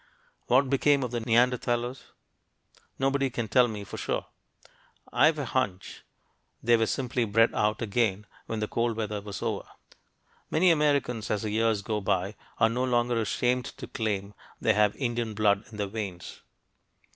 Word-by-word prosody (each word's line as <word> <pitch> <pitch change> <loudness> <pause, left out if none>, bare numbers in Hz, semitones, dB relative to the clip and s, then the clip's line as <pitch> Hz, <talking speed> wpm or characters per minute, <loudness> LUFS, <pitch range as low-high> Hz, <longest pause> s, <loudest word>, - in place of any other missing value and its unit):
What 130 +2 +4
became 140 +1 +3
of 125 - -3
the 120 - -1
Neanderthalers? 120 +1 +1 0.9
Nobody 135 0 +1
can 120 -2 -3
tell 125 +4 +4
me 105 -3 -5
for 100 - -8
sure. - - -2 0.9
I've 155 0 +4
a 145 - -2
hunch 100 -8 -2 0.6
they 120 +1 +5
were 115 -1 +2
simply 125 0 -1
"bred 115 +1 +3
out" 105 +2 0
again 105 -2 0 0.2
when 110 -1 -3
the 105 - -1
cold 115 0 -1
weather 105 -2 -3
was 100 -1 -7
over. - - -2 0.8
Many 175 +3 +4
Americans, 140 -7 +1
as 105 -1 -1
the 105 - -2
years 110 -1 +1
go 105 -1 -2
by, 95 +1 0 0.2
are 115 - +5
no 120 +3 -1
longer 120 -2 +1
ashamed 125 +4 0
to - - -6
claim 105 -2 -3 0.3
they 110 - +3
have 105 0 +3
"Indian 120 -4 -2
blood 100 -1 +2
in 110 - -11
their 105 - -1
veins." 100 -4 -6
115 Hz, 160 wpm, -28 LUFS, 105-125 Hz, 0.9 s, they